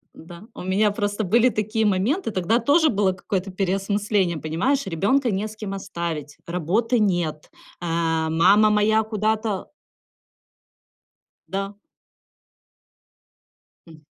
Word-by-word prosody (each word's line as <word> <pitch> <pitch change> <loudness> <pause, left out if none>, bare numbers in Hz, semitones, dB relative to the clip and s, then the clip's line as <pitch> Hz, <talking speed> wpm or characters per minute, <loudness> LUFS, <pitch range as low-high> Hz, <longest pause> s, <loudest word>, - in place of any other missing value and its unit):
Н-да. 170 +3 -12
У - - -7
меня 200 +3 +2
просто 205 +1 -2
были 235 +6 +4
такие 215 0 -1
моменты, 220 - 0
тогда 205 +4 +1
тоже 300 +6 +4
было 195 -3 +1
какое-то 195 0 -3
переосмысление, 195 -1 0
понимаешь, 185 - -1
ребёнка 205 - +1
не 200 +2 -1
с 215 - -11
кем 210 -2 -6
оставить, 165 -6 -5
работы 200 +8 0
нет, 175 -7 -1 0.3
а, 165 -2 0
мама 195 +7 +5
моя 215 +1 +3
куда-то 215 -1 -2 1.8
Да. 195 +1 -4 2.1
М. 160 -2 -15
200 Hz, 110 wpm, -23 LUFS, 175-215 Hz, 2.1 s, мама